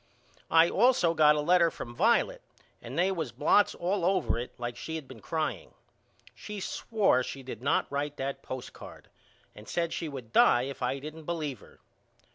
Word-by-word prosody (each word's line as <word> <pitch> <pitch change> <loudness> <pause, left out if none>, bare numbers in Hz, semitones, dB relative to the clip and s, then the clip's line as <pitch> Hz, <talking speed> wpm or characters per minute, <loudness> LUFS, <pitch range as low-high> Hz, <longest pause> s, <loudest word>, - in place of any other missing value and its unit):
I 165 +1 +6
all 245 +8 +4
so 170 -9 +1
got 150 -2 +5
a 150 - 0
letter 170 +2 +4
from 120 -6 -8
Violet 235 - +2 0.4
and - - -8
they 185 +3 +3
was 160 -9 -3
blots 205 - +3
all 185 +1 -1
over 185 -9 +1
it 120 - -5
like 120 0 -4
she 160 - -6
had 155 -4 -6
been 130 -3 -11
crying. 160 - -3 0.6
She 210 -1 -8
swore 200 - +1
she 135 +1 -6
did 125 -3 -8
not 140 - +1
write 145 +1 -3
that 135 +1 -4
postcard 130 -1 -9 0.4
and 105 +1 -13
said 170 -1 -1
she 165 - -3
would 125 -5 -9
die 120 - +5
if 135 +1 -6
I 125 +2 0
didn't 155 +3 -9
believe 155 -6 -3
her. - - -18
155 Hz, 185 wpm, -29 LUFS, 130-175 Hz, 0.6 s, I